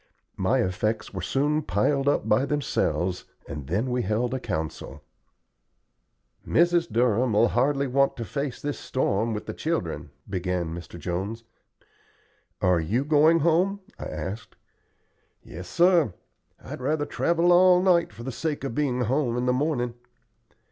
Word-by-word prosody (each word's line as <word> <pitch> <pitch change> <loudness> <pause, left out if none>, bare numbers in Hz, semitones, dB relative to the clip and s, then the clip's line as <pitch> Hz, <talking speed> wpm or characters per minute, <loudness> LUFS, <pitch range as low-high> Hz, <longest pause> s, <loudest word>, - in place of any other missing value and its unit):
My - - +2
effects 105 +4 -2
were 95 - -4
soon 145 - 0
piled 135 +6 0
up 145 - +1
by 105 +5 +3
themselves, 95 -10 -1 0.2
and 75 -3 -7
then 105 - -1
we 125 0 0
held 115 +4 -1
a 130 - -1
council. 80 -10 -5 1.4
"Mrs. 170 -2 +2
Durham'll 115 0 +3
hardly 140 +3 +1
want 135 +1 +2
to 115 - -4
face 140 +6 -4
this 145 0 -3
storm 115 -3 0
with 105 -1 -4
the - - -5
children," - - -3 0.2
began 90 -3 -2
Mr. 85 0 -8
Jones. 95 +7 -4 1.2
"Are 90 -2 +4
you 110 - -1
going 155 +2 +4
home?" 180 +5 +2 0.2
I - - -5
asked. 105 +4 -6 0.9
"Yes, 90 +3 -9
sir. 170 - +3 0.4
I'd - - -8
rather 145 +3 0
travel 170 +3 +1
all 180 0 +6
night 180 -2 +3
for 115 - -10
the 130 - -4
sake 150 +3 -3
of 135 - -3
being 130 -2 0
home 125 0 0
in 125 - -1
the 125 - +2
morning." 125 -3 0
125 Hz, 145 wpm, -26 LUFS, 100-150 Hz, 1.4 s, all